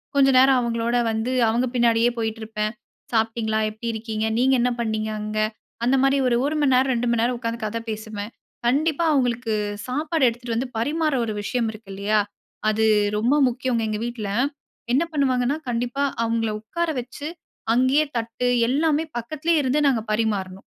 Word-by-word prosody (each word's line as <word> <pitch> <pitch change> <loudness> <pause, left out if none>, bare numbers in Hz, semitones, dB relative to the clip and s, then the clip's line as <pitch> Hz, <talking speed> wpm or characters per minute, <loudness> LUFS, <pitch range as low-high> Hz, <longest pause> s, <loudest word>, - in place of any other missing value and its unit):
கொஞ்ச 270 -1 +5
நேரம் 260 0 +6
அவங்களோட 235 0 -1 0.2
வந்து 220 +3 -1 0.2
அவங்க 240 +3 +1
பின்னாடியே 235 0 +4
போயிட்டு 225 -1 -2
இருப்பேன். 215 -1 -2 0.4
சாப்பிட்டீங்களா? 220 -1 +1
எப்படி 220 +2 -7
இருக்கீங்க? 220 -1 -3
நீங்க 260 +2 +3
என்ன 250 - +3
பண்ணீங்க. 220 -1 -1
அங்க 215 0 -4 0.5
அந்த 255 +3 +3
மாரி 270 +1 +3
ஒரு 240 - +3
1 305 +2 -1
மணி 270 -3 +3
நேரம் 260 +1 +3
2 240 0 -1
மணி 230 -1 +2
நேரம் 245 +1 +1
உக்காந்து 230 -1 -3
கதை 230 +2 -2
பேசுவேன். 215 0 -5 0.3
கண்டிப்பா 295 +6 +2
அவங்களுக்கு 245 -4 +1 0.3
சாப்பாடு 300 +3 -1
எடுத்துட்டு 235 0 -5
வந்து 255 +3 -1
பரிமாற 305 +5 0
ஒரு 215 - -3
விஷயம் 235 +2 -1
இருக்கு 215 -2 -14
இல்லையா, 205 +2 +1 0.5
அது 215 +1 +1 0.3
ரொம்ப 240 +7 +2
முக்கியங்க. 250 -1 -1
எங்க 210 - -2
வீட்டுல 230 -4 -4 0.6
என்ன 280 - +4
பண்ணுவாங்கன்னா 270 -1 +1
கண்டிப்பா 245 +3 -1 0.2
அவங்கள 225 -1 0
உக்கார 340 +11 -2
வச்சு 255 +5 -7 0.5
அங்கேயே 260 +5 +3
தட்டு 230 +2 -2 0.2
எல்லாமே 300 +4 +2
பக்கத்திலேயே 310 +7 0
இருந்து 265 +3 +1
நாங்க 240 -5 +2
பரிமாறணும். 200 -4 -1
235 Hz, 160 wpm, -23 LUFS, 220-265 Hz, 0.6 s, நேரம்